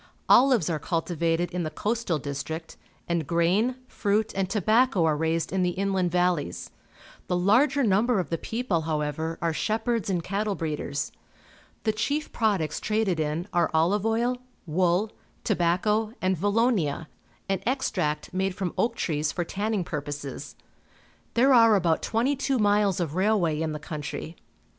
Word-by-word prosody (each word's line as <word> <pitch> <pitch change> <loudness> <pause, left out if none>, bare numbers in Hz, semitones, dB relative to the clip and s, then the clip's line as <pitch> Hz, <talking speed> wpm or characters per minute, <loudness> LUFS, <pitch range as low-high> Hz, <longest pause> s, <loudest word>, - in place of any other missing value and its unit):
Olives 250 - +5
are 165 -3 -1
cultivated 165 +1 -1
in 180 0 -2
the 155 - -2
coastal 210 +2 -1
district, 150 +3 -5 0.3
and 170 -4 -1
grain, 180 +10 +2
fruit, 215 -1 0
and 190 -1 0
tobacco 215 -1 +3
are 155 -2 +2
raised 160 +3 -1
in 190 - +1
the 180 0 0
inland 190 -2 +1
valleys. 175 - 0 0.6
The 180 - 0
larger 255 +10 +3
number 220 +2 +3
of 175 -4 -3
the 165 - -1
people, 225 -8 -1
however, 160 +1 -2
are 165 -1 +1
shepherds 225 +2 -1
and 175 -3 0
cattle 205 +2 -1
breeders. 150 -4 -3 0.7
The 220 - +2
chief 285 +8 -2
products 195 - 0
traded 210 -5 0
in 155 +4 -2
are 175 - +2
olive 180 +6 +2
oil, 235 +3 +1 0.3
wool, 180 +5 +1 0.3
tobacco, 210 +4 +1
and 185 0 +1
valonia 205 - +1 0.2
— - - -35
an 195 -1 -1
extract 155 - -1
made 190 0 -1
from 185 -3 -3
oak 230 0 +1
trees 150 -6 -1
for 175 - -2
tanning 205 +2 -2
purposes. 145 -2 -6 0.8
There 260 +3 +5
are 230 -3 +7
about 170 -4 +2
twenty 245 +6 +1
two 275 0 0
miles 205 -3 +2
of 165 -4 -2
railway 185 -5 +1
in 160 -1 -1
the 150 - -5
country. 150 +1 -6
185 Hz, 155 wpm, -26 LUFS, 160-215 Hz, 0.8 s, are